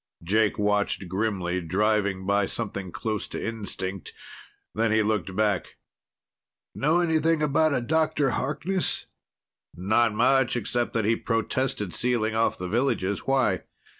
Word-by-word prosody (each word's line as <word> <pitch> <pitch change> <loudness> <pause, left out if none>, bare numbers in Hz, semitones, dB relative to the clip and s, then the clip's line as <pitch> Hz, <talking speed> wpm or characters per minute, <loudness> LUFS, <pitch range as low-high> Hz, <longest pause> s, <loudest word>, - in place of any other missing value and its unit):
Jake 105 +4 +2
watched 105 -2 0
grimly, 95 -2 -1
driving 100 +2 0
by 100 0 +2
something 100 -5 -4
close 110 +3 -3
to - - -5
instinct. 100 -4 -4 0.6
Then 115 0 +1
he 110 0 +3
looked 100 -4 -1
back. 105 -3 0 1.0
"Know 160 +5 +2
anything 160 -1 +2
about 150 +1 +3
a - - 0
Dr. 150 0 +1
Harkness?" 170 +9 -1 0.7
"Not 110 +4 +2
much, 125 +2 +3
except 120 +1 -1
that 115 -3 0
he 115 +2 +3
protested 115 -4 -1
sealing 120 -3 0
off 110 +1 +1
the 90 - -4
villages. 100 -3 -1
Why?" 130 -9 +2
110 Hz, 130 wpm, -26 LUFS, 100-130 Hz, 1.0 s, he